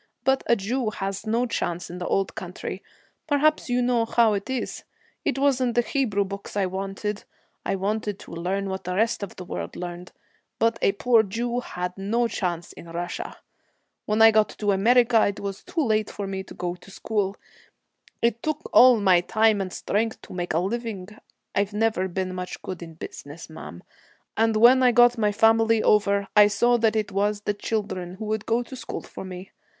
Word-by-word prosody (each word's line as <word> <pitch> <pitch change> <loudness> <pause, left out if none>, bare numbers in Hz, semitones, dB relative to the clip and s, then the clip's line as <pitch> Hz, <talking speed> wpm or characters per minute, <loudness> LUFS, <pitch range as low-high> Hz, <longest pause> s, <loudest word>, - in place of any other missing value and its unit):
But 265 +1 +2
a 235 - +5
Jew 230 +3 -1
has 195 +1 -4
no 230 +3 +1
chance 175 -7 -3
in 180 - -7
the 180 - -4
old 195 0 0
country; - - -6 0.5
perhaps 305 -1 +2
you 245 0 +2
know 240 -2 +2
how 230 -1 +3
it 200 +3 -3
is. 260 -1 -3 0.4
It 280 - 0
wasn't 260 -4 +2
the 240 - +4
Hebrew 230 -7 0
books 200 +1 -7
I 200 - +2
wanted. 195 +2 -4 0.4
I 195 - -1
wanted 205 +1 -2
to - - -12
learn 185 +4 -2
what 190 -1 -5
the 180 0 -2
rest 225 +3 +1
of 200 - -6
the 180 - -8
world - - -5
learned, 175 0 -7 0.5
but 230 0 +1
a 195 - +3
poor 230 +2 +4
Jew 235 +4 -2
had 180 -6 -5
no 230 +5 +1
chance 175 -6 -3
in 170 - -12
Russia. 175 - -5 0.7
When 215 +1 +3
I 225 - +9
got 215 -1 +3
to 205 -1 -1
America, 230 +3 +4
it 200 - -3
was 195 -1 -5
too 330 - -2
late 215 -2 +1
for 205 - -5
me 195 0 -4
to - - -12
go 175 0 -3
to 180 +2 -15
school. 200 -1 -2 0.9
It 235 0 +1
took 310 -1 -1
me 310 - -12
all 250 -2 +8
my 185 -4 +4
time 220 +2 +2
and 185 -1 -4
strength 220 +5 -1
to - - -11
make 175 -2 -3
a - - +3
living 205 -1 -3 0.4
I've 200 +1 0
never 210 -3 +1
been 185 0 -3
much 180 0 -5
good 185 -2 -6
in 165 -1 -9
business, 155 0 -9
ma'am 85 - -10 0.5
and 225 0 +2
when 240 +4 +7
I 250 -1 +5
got 240 0 +5
my 210 -1 +2
family 225 +1 +4
over, 200 -1 +3
I 210 -1 +8
saw 240 +4 +3
that 225 -2 +2
it 215 -1 -1
was 205 +1 0
the 205 - -1
children 200 -4 -3
would 215 -1 -3
go 230 +2 +1
to 260 - -10
school - - -6
for - - -9
me. 185 0 -9
210 Hz, 195 wpm, -25 LUFS, 190-230 Hz, 0.9 s, I